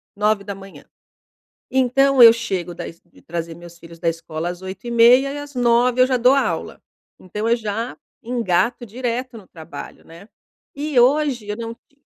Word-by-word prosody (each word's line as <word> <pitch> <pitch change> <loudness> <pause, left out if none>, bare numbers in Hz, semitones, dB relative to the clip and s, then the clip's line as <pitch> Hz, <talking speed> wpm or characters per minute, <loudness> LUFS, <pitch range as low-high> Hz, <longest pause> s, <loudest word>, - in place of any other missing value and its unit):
9h. 200 -2 -3 0.9
Então, 265 +1 +3
eu 230 - +11
chego 185 -6 -4
da 175 - -6
es 165 - -12
de 175 - -22
trazer 165 0 -5
meus 170 0 -13
filhos 165 0 -13
da 165 - -3
escola 165 0 -5
às 175 +1 -7
8h30 235 +7 +3
e 290 - -6
às 290 -1 -10
9h 245 +1 +3
eu - - +7
já 255 -1 +1
dou 250 +2 +5
aula. 275 - -2 0.4
Então, 210 +4 -4
eu 235 - +4
já 225 +1 -4 0.3
engato 235 0 0
direto 245 +2 -4
no 195 - -14
trabalho, 165 0 -10
né. 170 +6 -15 0.5
E 290 -2 0
hoje 260 -3 +2
eu 210 0 -4
não 230 -1 -5 0.2
ti 285 0 -37
230 Hz, 170 wpm, -21 LUFS, 180-250 Hz, 0.9 s, eu